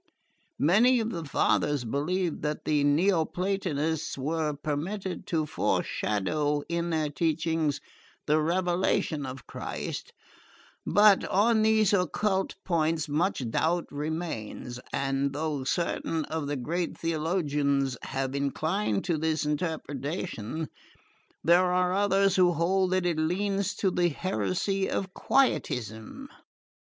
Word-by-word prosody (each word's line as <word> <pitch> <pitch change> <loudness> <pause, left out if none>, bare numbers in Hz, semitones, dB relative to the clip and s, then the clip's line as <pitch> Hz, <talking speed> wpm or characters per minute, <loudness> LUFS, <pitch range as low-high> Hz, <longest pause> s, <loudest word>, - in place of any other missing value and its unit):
Many 225 - +4
of 225 0 -1
the 170 -2 -4
fathers 145 -2 +1
believed 165 +8 -1
that 150 0 -3
the 150 -2 +2
Neoplatonists 165 -1 0
were 155 +2 -1
permitted 165 +7 -4
to 160 -3 0
foreshadow 145 +3 0
in 170 0 -1
their 155 -2 0
teachings 160 -1 0 0.5
the 155 +1 +3
revelation 175 -3 0
of 130 -2 -8
Christ; - - -5 0.8
but 205 -1 +6
on 220 +3 +3
these 220 -1 +4
occult 190 +1 +1
points 160 -2 +1
much 150 -3 0
doubt 170 +7 +1
remains, 145 -6 -4
and 135 0 0
though 150 -2 -2
certain 165 +1 -1
of 160 -2 -3
the 145 0 -2
great 165 +7 -2
theologians 150 -5 0
have 135 0 -3
inclined 140 - -1
to 170 -4 0
this 160 -1 0
interpretation, 150 - -3 0.8
there 180 +2 +5
are 180 0 +2
others 195 -1 +3
who 180 -1 +5
hold 185 +3 +2
that 185 -1 +1
it 170 -3 +1
leans 195 +4 0
to 190 - +1
the 175 -1 +2
heresy 180 - -1
of 190 -1 -2
Quietism." 125 - 0
160 Hz, 115 wpm, -28 LUFS, 145-185 Hz, 0.8 s, but